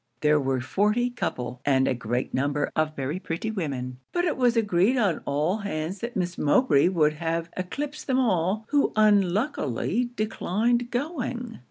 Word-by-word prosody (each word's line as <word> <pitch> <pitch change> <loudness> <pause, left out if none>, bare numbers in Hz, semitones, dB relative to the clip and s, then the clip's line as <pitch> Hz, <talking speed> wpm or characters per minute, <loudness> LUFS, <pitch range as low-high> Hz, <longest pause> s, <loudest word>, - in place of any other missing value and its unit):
There 150 0 +4
were 135 -2 0
forty 210 - +1
couple, 125 - -4
and 135 -2 +3
a - - +2
great 120 +1 -3
number 145 +2 0
of 155 0 0
very 140 +6 -3
pretty 185 +5 -3
women; 130 -10 -4
but 350 0 0
it 330 - 0
was 245 -2 +2
agreed 210 +3 +3
on 200 -9 +1
all 150 +8 +1
hands 190 -3 -4
that 235 +1 -5
Miss 180 -2 -2
Mowbray 150 - +4
would 155 -5 +2
have 165 +1 -3
eclipsed 290 +11 -5
them 260 -2 +2
all, 205 -3 +1
who 290 -1 +2
unluckily 210 - +2
declined 230 +3 0
going. 245 -3 -3
185 Hz, 160 wpm, -26 LUFS, 150-240 Hz, -, There